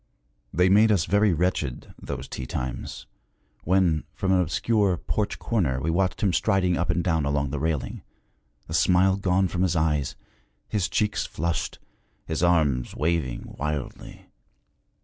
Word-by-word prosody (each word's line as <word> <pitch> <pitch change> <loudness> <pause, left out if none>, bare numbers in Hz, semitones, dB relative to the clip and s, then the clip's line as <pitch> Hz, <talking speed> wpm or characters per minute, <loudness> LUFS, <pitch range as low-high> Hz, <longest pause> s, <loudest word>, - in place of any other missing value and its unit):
They 90 +4 +3
made 105 +3 +5
us 95 -6 +2
very 100 +3 +3
wretched, 80 -6 -1
those - - -5
tea 65 - -6
times, 65 0 -5 0.6
when 90 -3 +2
from 95 - 0
an 95 -1 +4
obscure 95 +4 +1
porch 105 +4 -2
corner 80 - 0
we 80 +4 -1
watched 90 0 0
him 95 -3 +2
striding 90 -1 +2
up 85 0 -1
and 85 0 +1
down 80 -3 +1
along 70 -1 0
the 75 - -2
railing, 80 -2 -2 0.6
the - - -8
smile 95 +1 +4
gone 95 -1 +1
from 90 +1 -3
his 90 -2 +1
eyes, 75 -3 0 0.5
his 100 -4 -1
cheeks 105 -1 0
flushed, 85 +1 -2 0.5
his 80 - -3
arms 80 -8 +2
waving 80 -6 -2
wildly. 75 -1 -5
85 Hz, 150 wpm, -25 LUFS, 75-95 Hz, 0.6 s, made